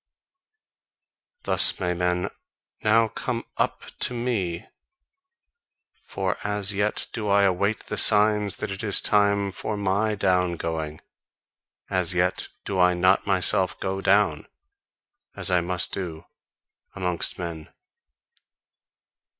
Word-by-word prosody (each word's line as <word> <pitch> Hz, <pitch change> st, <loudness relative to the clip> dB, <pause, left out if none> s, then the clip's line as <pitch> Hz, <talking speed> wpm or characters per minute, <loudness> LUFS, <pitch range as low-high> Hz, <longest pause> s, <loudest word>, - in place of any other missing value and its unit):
Thus -, -, +2 dB
may 90 Hz, -1 st, 0 dB
men 90 Hz, 0 st, -1 dB, 0.5 s
now 115 Hz, +1 st, +4 dB
come 115 Hz, +2 st, -4 dB
UP -, -, -1 dB
to 125 Hz, -, -1 dB
me; 105 Hz, -9 st, -2 dB, 1.4 s
for 95 Hz, 0 st, -2 dB
as 105 Hz, -1 st, 0 dB
yet 105 Hz, +1 st, 0 dB
do 110 Hz, -3 st, -3 dB
I 100 Hz, 0 st, +4 dB
await 100 Hz, +3 st, +1 dB
the 105 Hz, -, -2 dB
signs 105 Hz, -1 st, +4 dB
that 110 Hz, -, -5 dB
it 95 Hz, -, -5 dB
is 105 Hz, -2 st, +1 dB
time 100 Hz, -1 st, +2 dB
for 105 Hz, +3 st, -3 dB
my 100 Hz, +2 st, 0 dB
down 90 Hz, -3 st, +1 dB
going; 80 Hz, -2 st, -4 dB, 0.9 s
as -, -, 0 dB
yet -, -, 0 dB, 0.2 s
do 95 Hz, -2 st, -2 dB
I 90 Hz, 0 st, +4 dB
not 90 Hz, +3 st, +3 dB
myself 95 Hz, -1 st, +2 dB
go 95 Hz, 0 st, -3 dB
down, 100 Hz, +2 st, +2 dB, 0.9 s
as -, -, 0 dB
I 90 Hz, -1 st, +3 dB
must 90 Hz, 0 st, 0 dB
do, 85 Hz, -4 st, -5 dB, 0.7 s
amongst 90 Hz, -3 st, -1 dB
men. 85 Hz, -2 st, -6 dB
95 Hz, 120 wpm, -25 LUFS, 90-105 Hz, 1.4 s, now